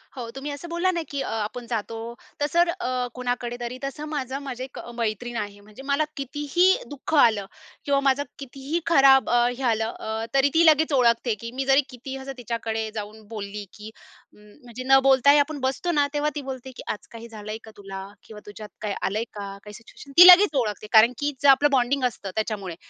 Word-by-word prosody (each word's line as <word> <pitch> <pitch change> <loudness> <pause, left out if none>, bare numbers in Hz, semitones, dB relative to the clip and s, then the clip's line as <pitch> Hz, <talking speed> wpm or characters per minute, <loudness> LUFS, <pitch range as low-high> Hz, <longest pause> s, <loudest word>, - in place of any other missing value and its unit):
हो, 235 -3 -6
तुम्ही 285 +2 -5
असं 285 +4 -8
बोलला 345 +2 0
ना, 340 -2 -2
की 280 -1 -3
आपण 225 +2 -4
जातो, 225 -1 -4 0.4
तसं 300 +4 +1
अ, - - +8
तर 255 -9 -2
कुणाकडे 245 -1 -3
तरी, 240 +1 -5
तसं 275 +2 -5
माझं 270 -3 -4
माझी 255 -2 -6
1 260 - -9 0.2
मैत्रीण 235 +1 -3
आहे, 205 -1 -5
म्हणजे 210 +5 -14
मला 285 +2 +1
कितीही 290 +5 0 0.2
दुःख 290 +2 -7
आलं 220 -8 +4 0.4
किंवा 280 -1 +2
माझं 275 +2 +2 0.2
कितीही 275 +4 -4
खराब 275 -4 +5
अ, 240 0 +3
हे 270 - -6
आलं, 225 -1 +1
अ 220 +1 -4
तरी 275 +1 +4
ती 330 +1 +4
लगेच 310 -1 +4
ओळखते, 235 -2 +3
की 230 +2 -7
मी 265 +1 -3
जरी 270 +1 +5
कितीही 265 +1 -8
असं 270 +1 -7
तिच्याकडे 225 -2 -3
जाऊन 215 +1 -7
बोलली, 210 -1 -6
की 210 +1 -10 0.4
म्हणजे 235 +4 -12
न 270 0 +7
बोलताही 270 +2 +5
आपण 290 0 -1
बसतो 265 +7 -1
ना, 290 -3 +2
तेव्हा 295 +1 0
ती 290 - -3
बोलते 260 -1 -7
की - - -9
"आज 210 - -8
काही 230 0 -10
झालंय 215 -1 -7
का 220 - -12
तुला?" 195 -1 -8 0.2
किंवा 215 -1 -12
"तुझ्यात 210 +1 -10
काय 210 -2 -2
आलंय 215 +4 -1
का?" 205 - -7 0.2
काही 210 0 -11
सिच्युएशन 235 +5 -14
ती 355 +1 +11
लगेच 365 -3 +8
ओळखते, 215 -3 -2
कारण 230 +3 +6
की 290 0 0
जे 285 - +3
आपलं 280 +2 +6
बॉन्डिंग 265 +1 +1
असतं 215 -5 -3
त्याच्यामुळे. 210 -5 -3
250 Hz, 200 wpm, -24 LUFS, 220-280 Hz, 0.4 s, ती